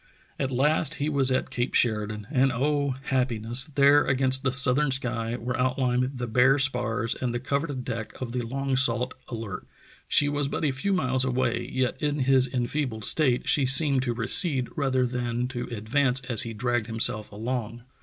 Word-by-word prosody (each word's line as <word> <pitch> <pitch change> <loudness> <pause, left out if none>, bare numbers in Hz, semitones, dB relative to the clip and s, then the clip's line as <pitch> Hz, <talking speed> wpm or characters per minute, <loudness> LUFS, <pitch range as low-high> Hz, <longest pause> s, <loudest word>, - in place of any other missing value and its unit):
At 135 - -1
last 150 +4 +1
he 150 -1 -2
was 140 -3 +2
at 130 0 -1
Cape 125 +1 -3
Sheridan, 105 -2 0
and 135 -2 +2
oh! 140 +1 -1
happiness, 125 -2 -1
there 140 +1 +5
against 130 0 +2
the 130 - 0
southern 130 +2 +3
sky 120 -3 -2
were 125 +1 -4
outlined 125 0 -1
the 125 - -3
bare 125 +4 +3
spars 125 -4 0
and 120 -2 -4
the - - -2
covered 140 0 -3
deck 115 -3 -6
of 125 -2 -5
the 125 0 -3
long 135 +3 -3
sought 125 -1 +2
Alert. 110 -5 -7 0.4
She 145 - +4
was 145 -1 -1
but 155 - -3
a 145 - +1
few 140 +10 -2
miles 130 -8 +1
away, 130 -2 -2
yet 130 -1 -2
in 145 -1 -1
his 130 0 +3
enfeebled 125 -3 -3
state 130 -6 +1
she 135 -3 +2
seemed 135 0 +5
to 120 -2 -3
recede 130 +2 +3
rather 130 -3 0
than 120 0 -3
to 120 -2 -5
advance 125 +4 0
as 125 -4 +3
he 115 -1 -4
dragged 120 -1 -2
himself 110 -2 -2
along. 115 +1 -5
130 Hz, 180 wpm, -25 LUFS, 120-135 Hz, 0.4 s, there